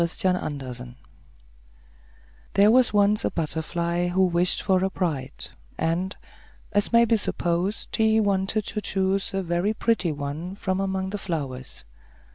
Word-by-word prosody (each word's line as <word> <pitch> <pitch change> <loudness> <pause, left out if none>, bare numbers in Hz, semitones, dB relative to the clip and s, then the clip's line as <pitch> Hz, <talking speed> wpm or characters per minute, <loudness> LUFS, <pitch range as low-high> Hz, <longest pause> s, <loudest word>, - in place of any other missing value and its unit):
THE 170 - -3 0.4
BUTTERFLY 125 -2 -7 1.6
There 205 +2 +6
was 250 +1 +5
once 205 0 +3
a - - +1
butterfly 170 +2 -1
who 185 +2 +3
wished 175 0 +2
for 190 -2 +2
a 190 - +1
bride, 150 -8 -3 0.3
and, 175 +4 -1 0.5
as 205 0 +1
may 235 0 +6
be 230 0 +3
supposed, 180 0 -1
he 220 0 +3
wanted 200 0 +1
to 210 - -3
choose 195 0 0
a 195 0 -2
very 175 +5 0
pretty 220 -7 +1
one 150 +5 -5
from 190 -2 -2
among 190 -1 -2
the 205 - -3
flowers. 135 - -5
190 Hz, 140 wpm, -25 LUFS, 170-205 Hz, 1.6 s, There